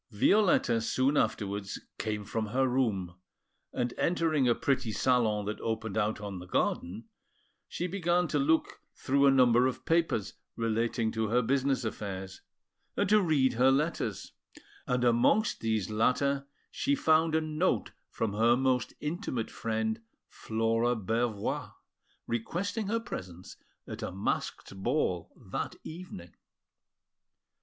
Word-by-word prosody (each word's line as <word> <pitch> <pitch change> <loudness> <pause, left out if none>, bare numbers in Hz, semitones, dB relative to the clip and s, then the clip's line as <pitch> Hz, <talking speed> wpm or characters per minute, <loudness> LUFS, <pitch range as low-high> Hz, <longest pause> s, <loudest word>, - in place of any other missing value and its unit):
Violetta 120 - +3
soon 130 +5 +1
afterwards 100 -6 -1 0.2
came 105 -1 -3
from 110 +1 -2
her 130 +5 +1
room, 110 -9 0 0.6
and, 120 -1 -2
entering 160 -6 +2
a 120 - +4
pretty 135 -7 0
salon 110 -4 +2
that 105 +1 -4
opened 110 -2 -3
out 110 -1 0
on 100 -3 -6
the 90 - -10
garden, 90 +4 -1 0.6
she 175 - -3
began 175 -1 +1
to 150 - 0
look 160 +4 +1
through 140 +1 +2
a - - +7
number 125 -2 +5
of 130 - -4
papers 165 - +1 0.2
relating 115 0 0
to 110 0 -1
her 120 +3 +2
business 135 0 +1
affairs, 95 -3 -5 0.6
and - - +1
to 210 0 +6
read 145 -8 +2
her 125 +3 +4
letters; 150 +5 -1 0.6
and 125 0 +1
amongst 125 - +3
these 110 -3 -1
latter 140 +5 +1 0.2
she 285 0 +1
found 160 - +3
a - - +4
note 155 +3 0 0.2
from 110 -3 -2
her 115 +3 +4
most 130 -2 0
intimate 150 - -3
friend, 110 0 -2 0.3
Flora 115 +2 0
Bervoix, 110 0 -2 0.5
requesting 195 - -2
her 230 +3 0
presence 95 - -8 0.3
at - - -7
a - - -3
masked 95 +1 -3
ball 95 - 0 0.2
that - - -3
evening. 155 - -9
120 Hz, 130 wpm, -30 LUFS, 110-150 Hz, 0.6 s, a